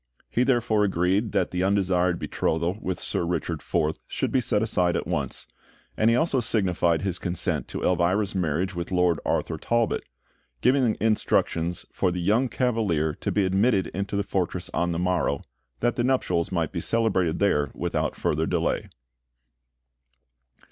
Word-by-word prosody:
He 120 Hz, -, +1 dB
therefore 120 Hz, -5 st, +2 dB
agreed 95 Hz, +3 st, +1 dB
that -, -, +1 dB
the 90 Hz, -, -1 dB
undesired 90 Hz, -2 st, +2 dB
betrothal 85 Hz, +3 st, -1 dB
with 95 Hz, -1 st, -3 dB
Sir -, -, -2 dB
Richard 85 Hz, -2 st, -2 dB
Forth 75 Hz, +1 st, -1 dB
should -, -, -2 dB
be 130 Hz, -, +2 dB
set 105 Hz, -2 st, +1 dB
aside 90 Hz, -6 st, +1 dB
at -, -, -1 dB
once; -, -, -3 dB, 0.5 s
and 110 Hz, -, +3 dB
he 115 Hz, -, +4 dB
also 140 Hz, -1 st, +2 dB
signified 90 Hz, -7 st, +1 dB
his 95 Hz, -2 st, -1 dB
consent 90 Hz, -2 st, -2 dB
to -, -, -5 dB
Elvira's 90 Hz, +4 st, +1 dB
marriage 90 Hz, 0 st, -1 dB
with 85 Hz, 0 st, -5 dB
Lord 90 Hz, -3 st, +2 dB
Arthur -, -, -1 dB
Talbot, 115 Hz, -1 st, 0 dB, 0.6 s
giving 125 Hz, -, +3 dB
instructions 90 Hz, -6 st, 0 dB
for 90 Hz, -, +1 dB
the 90 Hz, 0 st, -3 dB
young 110 Hz, +9 st, +2 dB
Cavalier 105 Hz, -, 0 dB
to -, -, -1 dB
be 100 Hz, -2 st, +2 dB
admitted 95 Hz, +2 st, +2 dB
into 100 Hz, +1 st, -3 dB
the 100 Hz, -, +1 dB
fortress 90 Hz, -2 st, -2 dB
on 85 Hz, +2 st, 0 dB
the 85 Hz, -, -2 dB
morrow, 90 Hz, -5 st, 0 dB, 0.4 s
that 120 Hz, 0 st, +1 dB
the 120 Hz, -, +1 dB
nuptials 105 Hz, -10 st, +1 dB
might 85 Hz, -3 st, -1 dB
be 85 Hz, -, -3 dB
celebrated 95 Hz, -8 st, +1 dB
there 75 Hz, -9 st, +2 dB
without -, -, -1 dB
further 80 Hz, +2 st, 0 dB
delay. -, -, -1 dB
95 Hz, 160 wpm, -25 LUFS, 85-110 Hz, 0.6 s, he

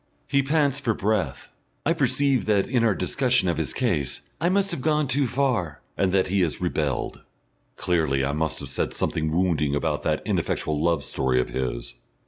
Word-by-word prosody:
He 140 Hz, -1 st, +3 dB
pants 140 Hz, -1 st, +1 dB
for 115 Hz, -6 st, 0 dB
breath. 105 Hz, 0 st, -1 dB, 0.3 s
I 165 Hz, -, +3 dB
perceive 135 Hz, -2 st, +2 dB
that 105 Hz, -2 st, +2 dB
in 125 Hz, -3 st, +1 dB
our 110 Hz, -4 st, +3 dB
discussion 125 Hz, -5 st, +1 dB
of 85 Hz, -3 st, 0 dB
his 80 Hz, -, -1 dB
case 90 Hz, -, -1 dB, 0.2 s
I 170 Hz, -, +2 dB
must 195 Hz, +1 st, +1 dB
have -, -, -4 dB
gone 150 Hz, 0 st, +1 dB
too 135 Hz, +1 st, +1 dB
far, 120 Hz, -, 0 dB, 0.2 s
and 95 Hz, -2 st, +1 dB
that 95 Hz, -1 st, +2 dB
he 95 Hz, 0 st, +2 dB
has 85 Hz, -4 st, 0 dB
rebelled. 75 Hz, -7 st, -2 dB, 0.5 s
Clearly 80 Hz, -6 st, +1 dB
I 70 Hz, -, 0 dB
must 80 Hz, +2 st, -1 dB
have -, -, -6 dB
said -, -, -2 dB
something 80 Hz, 0 st, -1 dB
wounding 80 Hz, -4 st, +1 dB
about 75 Hz, 0 st, -1 dB
that -, -, -1 dB
ineffectual 75 Hz, -1 st, -1 dB
love 85 Hz, 0 st, +1 dB
story 65 Hz, -1 st, 0 dB
of 60 Hz, -, -1 dB
his. 60 Hz, -2 st, -3 dB
95 Hz, 185 wpm, -25 LUFS, -, 0.5 s, He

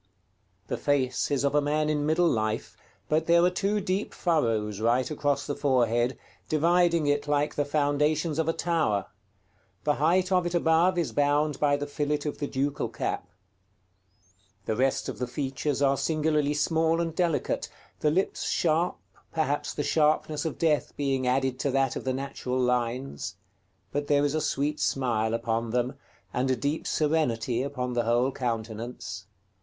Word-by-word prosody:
The -, -, -3 dB
face 130 Hz, -3 st, 0 dB
is 140 Hz, -1 st, 0 dB
of 140 Hz, -, +1 dB
a 150 Hz, -, +4 dB
man 150 Hz, +1 st, 0 dB
in 150 Hz, -1 st, 0 dB
middle 170 Hz, +3 st, +3 dB
life, 110 Hz, -6 st, -1 dB, 0.3 s
but 155 Hz, +1 st, +1 dB
there 170 Hz, 0 st, +5 dB
are 180 Hz, -, +4 dB
two 200 Hz, +3 st, 0 dB
deep 195 Hz, +1 st, -2 dB
furrows 115 Hz, -, 0 dB
right 120 Hz, +5 st, +1 dB
across 145 Hz, -2 st, 0 dB
the 145 Hz, -, -2 dB
forehead, 125 Hz, -4 st, +1 dB, 0.3 s
dividing 170 Hz, +1 st, +3 dB
it 145 Hz, 0 st, +1 dB
like 145 Hz, 0 st, +1 dB
the 145 Hz, -, 0 dB
foundations 150 Hz, +2 st, +1 dB
of 160 Hz, 0 st, +1 dB
a -, -, +2 dB
tower: 155 Hz, -, 0 dB, 0.8 s
the 150 Hz, -, +2 dB
height 180 Hz, +4 st, +3 dB
of 180 Hz, -2 st, +3 dB
it 175 Hz, -, -3 dB
above 170 Hz, +2 st, +3 dB
is 170 Hz, -3 st, 0 dB
bound 145 Hz, 0 st, +1 dB
by 145 Hz, -1 st, +3 dB
the 145 Hz, -, -3 dB
fillet 145 Hz, +1 st, -1 dB
of 150 Hz, -, -3 dB
the 145 Hz, -, -2 dB
ducal 140 Hz, +1 st, -1 dB
cap. -, -, -3 dB, 1.4 s
The 110 Hz, -, -1 dB
rest 130 Hz, +3 st, +1 dB
of -, -, -5 dB
the 125 Hz, -, -1 dB
features 140 Hz, +2 st, -2 dB
are 135 Hz, 0 st, +3 dB
singularly 150 Hz, -2 st, +1 dB
small 160 Hz, +2 st, +2 dB
and 165 Hz, -1 st, -1 dB
delicate, 170 Hz, -4 st, 0 dB, 0.3 s
the 150 Hz, -, +2 dB
lips 185 Hz, +6 st, 0 dB
sharp, 165 Hz, +2 st, +1 dB, 0.3 s
perhaps 145 Hz, -2 st, -1 dB
the 145 Hz, -, -3 dB
sharpness 150 Hz, 0 st, +1 dB
of 160 Hz, -, -3 dB
death 155 Hz, -3 st, 0 dB
being 135 Hz, -3 st, 0 dB
added 130 Hz, 0 st, +1 dB
to 140 Hz, -, 0 dB
that 135 Hz, 0 st, +1 dB
of -, -, -5 dB
the 130 Hz, -, 0 dB
natural 130 Hz, -1 st, -3 dB
lines; 125 Hz, -, -1 dB, 0.6 s
but 145 Hz, 0 st, -2 dB
there 145 Hz, 0 st, +3 dB
is 145 Hz, -, 0 dB
a 155 Hz, -, 0 dB
sweet 145 Hz, +2 st, -1 dB
smile 115 Hz, -4 st, 0 dB
upon 115 Hz, 0 st, -1 dB
them, 125 Hz, +3 st, 0 dB, 0.4 s
and 130 Hz, +2 st, 0 dB
a 130 Hz, -, +3 dB
deep 140 Hz, +6 st, -2 dB
serenity 125 Hz, -7 st, +1 dB
upon 130 Hz, -2 st, -3 dB
the 120 Hz, -1 st, 0 dB
whole 120 Hz, +3 st, +2 dB
countenance. 115 Hz, -5 st, -4 dB
145 Hz, 170 wpm, -27 LUFS, 125-155 Hz, 1.4 s, there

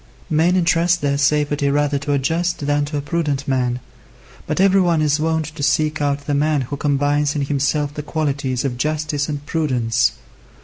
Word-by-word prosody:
Men 165 Hz, +4 st, +3 dB
entrust 170 Hz, 0 st, +2 dB
their 140 Hz, -1 st, 0 dB
safety 145 Hz, 0 st, +1 dB
rather 145 Hz, 0 st, +1 dB
to 145 Hz, +1 st, -2 dB
a -, -, +3 dB
just 165 Hz, +3 st, -1 dB
than 145 Hz, 0 st, +1 dB
to 145 Hz, 0 st, -4 dB
a -, -, -1 dB
prudent 145 Hz, -3 st, -2 dB
man. 125 Hz, -2 st, 0 dB, 0.7 s
But -, -, -2 dB
every 195 Hz, 0 st, +5 dB
one 170 Hz, -3 st, +2 dB
is 150 Hz, 0 st, +2 dB
wont 160 Hz, 0 st, 0 dB
to 155 Hz, -, -7 dB
seek 155 Hz, +2 st, +1 dB
out 145 Hz, 0 st, -1 dB
the 145 Hz, -, -1 dB
man 150 Hz, 0 st, +1 dB
who 130 Hz, +3 st, -4 dB
combines 145 Hz, +1 st, +1 dB
in 145 Hz, -, 0 dB
himself 145 Hz, +1 st, 0 dB
the 150 Hz, -, -5 dB
qualities 140 Hz, -4 st, -2 dB
of 125 Hz, -3 st, -2 dB
justice 150 Hz, +1 st, -1 dB
and 145 Hz, -1 st, -4 dB
prudence. 120 Hz, -7 st, +1 dB
145 Hz, 185 wpm, -20 LUFS, 140-155 Hz, 0.7 s, every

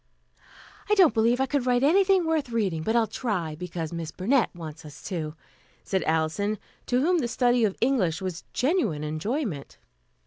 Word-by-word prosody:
"I 420 Hz, -, +4 dB
don't 365 Hz, -, +6 dB
believe 230 Hz, +2 st, +2 dB
I 265 Hz, -, +3 dB
could 270 Hz, -2 st, -1 dB
write 245 Hz, 0 st, +3 dB
anything 380 Hz, +3 st, +4 dB
worth 320 Hz, -5 st, 0 dB
reading, 200 Hz, -9 st, -1 dB
but 220 Hz, +8 st, -1 dB
I'll 230 Hz, -1 st, +4 dB
try, 200 Hz, -10 st, -3 dB
because 165 Hz, 0 st, -5 dB
Miss 165 Hz, -2 st, -4 dB
Burnett 230 Hz, -, +1 dB
wants 165 Hz, -2 st, -8 dB
us 150 Hz, -2 st, -12 dB
to," 160 Hz, -5 st, -4 dB, 0.5 s
said 190 Hz, -1 st, -1 dB
Alison, 160 Hz, +7 st, 0 dB, 0.3 s
to 250 Hz, +1 st, +2 dB
whom 350 Hz, +4 st, +3 dB
the 250 Hz, -, -1 dB
study 245 Hz, 0 st, +2 dB
of 200 Hz, -, -2 dB
English 225 Hz, -10 st, +2 dB
was 185 Hz, -3 st, -5 dB
genuine 250 Hz, -, 0 dB
enjoyment. 155 Hz, -, -3 dB
220 Hz, 170 wpm, -26 LUFS, 165-265 Hz, 0.5 s, don't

